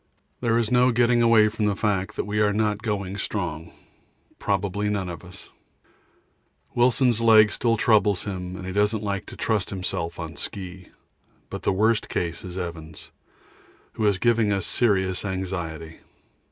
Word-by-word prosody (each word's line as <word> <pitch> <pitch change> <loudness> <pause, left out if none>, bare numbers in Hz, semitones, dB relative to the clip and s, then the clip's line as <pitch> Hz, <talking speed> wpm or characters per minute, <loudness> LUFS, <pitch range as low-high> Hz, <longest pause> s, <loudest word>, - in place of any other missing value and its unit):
There 115 -2 +1
is 115 -1 0
no 125 +1 +4
getting 120 0 +3
away 115 -2 +5
from 105 0 -2
the 105 -1 +1
fact 100 -1 -1
that - - -1
we 105 0 -2
are 105 -1 +3
not 105 0 0
going 100 -3 -3
strong. 85 -6 -4 0.7
Probably 100 +1 -1
none 100 -3 -2
of 85 -3 -8
us: 90 +2 -13 1.2
Wilson's 120 -1 +3
leg 110 -2 +6
still 115 -1 +1
troubles 105 -4 +3
him 90 -2 -5
and 95 - -7
he 95 - -4
doesn't 105 +2 +1
like 100 -2 -3
to - - -9
trust 105 -4 0
himself 85 -3 -4
on 80 -1 -6
ski; 95 -2 -7 0.6
but - - -5
the - - +1
worst 110 +3 +1
case 85 -1 -2
is 90 0 -7
Evans, 80 -3 -7 0.8
who 110 - 0
is 100 -2 +2
giving 115 -1 +2
us 100 -2 0
serious 95 -6 +1
anxiety. 85 -5 -5
100 Hz, 160 wpm, -24 LUFS, 90-110 Hz, 1.2 s, leg